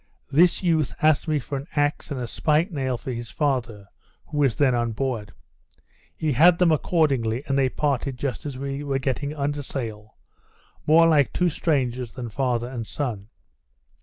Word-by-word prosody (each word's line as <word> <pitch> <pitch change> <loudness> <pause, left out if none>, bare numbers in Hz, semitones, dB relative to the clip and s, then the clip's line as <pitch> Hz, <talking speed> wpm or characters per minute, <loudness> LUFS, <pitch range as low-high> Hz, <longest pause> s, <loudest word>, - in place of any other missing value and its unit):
This 170 +6 +4
youth 160 -5 +1
asked 155 +1 +3
me 155 -1 +1
for 140 0 -4
an 140 - -10
axe 145 0 0
and 140 -3 -4
a 125 - -3
spike 155 - +1
nail 130 -5 -2
for 130 - -6
his 120 -1 -6
father, 120 -8 -2 0.4
who 150 - -4
was 135 -6 +3
then 135 0 +3
on 120 -1 0
board. 115 -4 -3 0.9
He 155 -2 0
had 170 +6 +6
them 175 -2 +4
accordingly, 140 -7 +1
and 135 - -1
they 135 -1 +3
parted 140 -2 -1
just 135 +1 -3
as 135 -3 -6
we 140 +1 -4
were 140 -2 -1
getting 140 +2 -2
under 145 0 -2
sail, 110 -6 -6 0.7
more 165 +2 +6
like 150 -4 +4
two 180 -1 +2
strangers 130 -7 -1
than 120 -2 -6
father 120 -1 -1
and 120 -3 -6
son. 110 -8 -4
135 Hz, 175 wpm, -24 LUFS, 120-150 Hz, 0.9 s, had